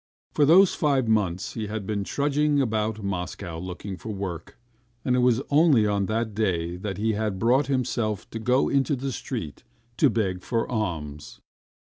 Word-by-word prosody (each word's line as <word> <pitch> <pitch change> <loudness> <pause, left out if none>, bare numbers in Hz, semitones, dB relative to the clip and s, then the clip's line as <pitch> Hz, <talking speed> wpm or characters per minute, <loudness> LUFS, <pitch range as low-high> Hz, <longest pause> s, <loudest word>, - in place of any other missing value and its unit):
For 145 - +4
those 180 +5 +6
five 140 -6 +1
months 105 +1 0
he 110 -3 -4
had 105 -1 -4
been 100 0 -2
trudging 145 +4 +1
about 110 -3 -1
Moscow 90 -2 -4
looking 90 +2 -6
for 110 - -8
work, 95 -5 -5 0.5
and 125 - +2
it - - +2
was 125 +1 +3
only 145 -7 +5
on 100 -2 0
that 110 0 -1
day 90 -5 -1
that 95 0 -5
he 110 +2 0
had 105 -2 -2
brought 125 +6 +3
himself 120 -6 -1
to 115 - -5
go 125 +4 +2
into 140 +1 +1
the 135 +1 -3
street 110 - -5 0.3
to - - +5
beg 95 -5 -1
for 115 +4 -1
alms. 80 -10 -4
110 Hz, 170 wpm, -25 LUFS, 95-125 Hz, 0.5 s, those